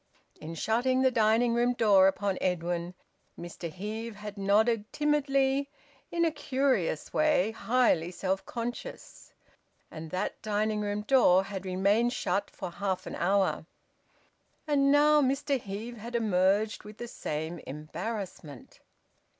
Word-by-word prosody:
In 160 +2 -7
shutting 250 +8 +1
the 260 - +4
dining 230 +1 +3
room 240 +1 +2
door 205 -5 +5
upon 195 0 -1
Edwin, 175 0 -2 0.4
Mr 170 -1 -7
Heve 215 +5 -6
had 210 0 -8
nodded 210 +2 +1
timidly 280 -2 +1 0.4
in 340 0 +1
a 325 - +2
curious 260 - -1
way, 300 -10 +2
highly 220 -6 +1
self 190 +1 -2
conscious. 240 +1 -7 0.6
And 160 0 -8
that 185 +4 -3
dining 215 0 -1
room 205 0 -2
door 210 -7 +5
had 195 -1 -6
remained 200 +6 +2
shut 200 -2 -1
for 175 - -7
half 190 0 -3
an - - -6
hour. 180 -4 +1 1.0
And 280 -2 +3
now 300 +1 +5
Mr 275 0 0
Heve 220 +4 -6
had 235 +3 -7
emerged 205 -1 +1
with 210 0 -12
the 240 - -6
same 160 -5 -4
embarrassment. 160 - -7
210 Hz, 130 wpm, -29 LUFS, 185-245 Hz, 1.0 s, door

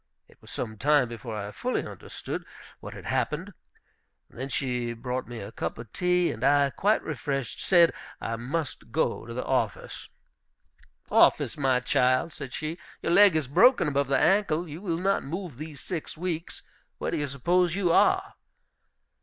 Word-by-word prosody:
It - - -23
was - - -14
some 110 -3 -5
time 145 -2 +3
before 115 -1 -6
I 100 0 -5
fully 250 - -2
understood - - -7 0.4
what - - -9
had - - -10
happened. 180 +7 -1 0.8
Then 130 +3 -6
she 125 -4 -2
brought 125 +2 -4
me 120 0 -7
a 100 -1 -7
cup - - -4
of 115 -2 -10
tea, 180 -1 +2
and 115 - -7
I, 140 0 +4
quite 210 +9 +2
refreshed, 135 -4 -3
said 170 -3 +5 0.3
I 115 - -3
must 130 -1 -4
go 120 -5 0
to 115 - -6
the 125 - -3
office. 115 -8 -2 1.0
"Office, - - +4
my 130 -3 +2
child!" 130 +6 +2
said 140 -3 -7
she. 155 +4 -4 0.2
"Your - - 0
leg 200 -1 +7
is 155 -4 0
broken 240 - +5
above 140 -1 +1
the 135 - +2
ankle; 180 -4 +2
you 155 +3 -8
will 170 -5 -1
not 195 +3 +1
move 170 -2 -5
these 155 -3 -7
six 165 -3 -5
weeks. 170 -1 -4 0.3
Where - - -3
do - - -1
you 145 - -1
suppose 170 +6 +1
you 190 -4 +1
are?" - - +3
145 Hz, 170 wpm, -27 LUFS, 125-170 Hz, 1.0 s, leg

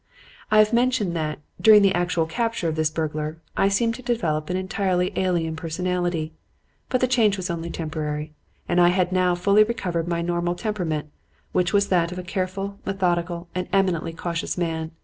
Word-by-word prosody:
"I 215 - +4
have 215 +1 +5
mentioned 235 -7 +2
that, 155 -2 -2 0.2
during 215 -2 +8
the 195 -1 +4
actual 175 -2 +1
capture 230 +1 -1
of 160 - -1
this 155 -1 +1
burglar, 155 0 -3 0.2
I 195 - +3
seemed 230 +4 +2
to 255 - -8
develop 170 -11 -1
an 180 - 0
entirely 185 -1 0
alien 170 -4 0
personality. 175 -1 -2 0.6
But 255 - +1
the 255 - +3
change 225 -5 +3
was 185 -1 -3
only 170 0 -4
temporary, 155 -2 -4 0.3
and 175 0 +3
I 175 - +7
had 180 0 +2
now 180 -1 +2
fully 200 +4 +5
recovered 180 -7 -2
my 170 -1 -1
normal 175 0 -1
temperament, 175 -8 -3 0.4
which 180 -1 +1
is 200 0 +3
that 170 -2 +2
of 180 - -6
a 180 - -4
careful, 195 +2 -3
methodical 175 -2 -1
and 180 0 -3
eminently 180 -4 +1
cautious 170 +1 -3
man. 160 -2 -2
180 Hz, 180 wpm, -24 LUFS, 165-195 Hz, 0.6 s, during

